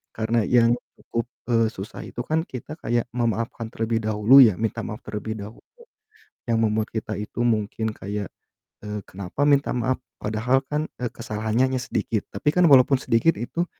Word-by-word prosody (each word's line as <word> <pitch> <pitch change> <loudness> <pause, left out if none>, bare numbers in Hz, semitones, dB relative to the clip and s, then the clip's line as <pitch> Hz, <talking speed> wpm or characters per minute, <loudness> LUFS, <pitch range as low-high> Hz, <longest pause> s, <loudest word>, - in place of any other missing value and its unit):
karena 115 +1 +1
yang 120 -1 +5 0.3
cukup, 115 0 -3 0.3
eee, 115 -1 +4
susah 95 0 -8
itu 120 - -6
kan 160 +3 +1
kita 130 +4 -7
kayak 120 0 0
memaafkan 115 -1 -1
terlebih 115 0 0
dahulu 110 +5 +6
ya 110 -5 +5
minta 115 +1 -1
maaf 105 -1 -6
terlebih 105 +1 -4
dahulu 105 +3 -10 0.9
yang 115 - +3
membuat 110 0 +1
kita 110 -1 -3
itu 105 +3 -6
mungkin 110 0 0
kayak, 100 -1 -5 0.6
eee, 105 0 -4
kenapa 100 +9 -3
minta 140 -1 +3
maaf 125 +1 0 0.2
padahal 115 +5 +1
kan, 150 +1 0 0.2
eee, 120 - -1
kesalahannya 110 +1 -1
hanya 125 - -1
sedikit 115 -4 -2
tapi 150 - 0
kan 180 -1 +5
walaupun 135 +1 +7
sedikit 115 +9 +3
itu 170 +9 -2
115 Hz, 165 wpm, -24 LUFS, 110-125 Hz, 0.9 s, walaupun